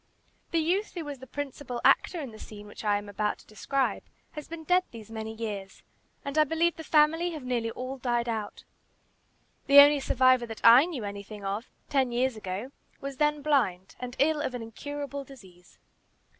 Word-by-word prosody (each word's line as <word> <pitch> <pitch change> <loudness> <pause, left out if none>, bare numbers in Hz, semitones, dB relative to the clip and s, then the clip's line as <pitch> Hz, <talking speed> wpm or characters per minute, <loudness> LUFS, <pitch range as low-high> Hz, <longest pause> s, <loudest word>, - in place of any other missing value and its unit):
The 335 - 0
youth 365 +7 0
who 335 -3 -4
was 285 -2 -6
the 260 - -11
principal 275 -2 -5
actor 350 - +4
in 275 -6 -6
the 215 - -12
scene 210 -1 -10
which 210 - -10
I 205 -1 +2
am 205 0 -7
about 210 +1 -1
to - - -19
describe, 265 +5 -1 0.3
has 300 -2 -8
been 330 -1 -8
dead 360 +3 +4
these 225 -2 -11
many 220 0 -5
years, 210 -4 -6 0.4
and 280 +2 0
I - - +8
believe 325 +3 +1
the 320 - -8
family 320 +3 +3
have 305 -4 -7
nearly 240 -2 -1
all 255 +3 -6
died 240 -1 0
out. 220 -3 -4 1.0
The 280 +1 +6
only 290 +1 +9
survivor 255 -2 +3
that 225 -1 -8
I 240 +5 +9
knew 315 -10 -5
anything 200 0 -7
of 205 +5 -3 0.2
ten 265 -4 +1
years 250 +1 +1
ago 210 +4 -5 0.3
was 275 -1 -6
then 295 0 +1
blind, 225 -12 +1
and 250 0 -6
ill 300 +1 +2
of 260 - -2
an 240 - -5
incurable 280 +5 -6
disease. 190 -10 -16
255 Hz, 190 wpm, -28 LUFS, 220-290 Hz, 1.0 s, only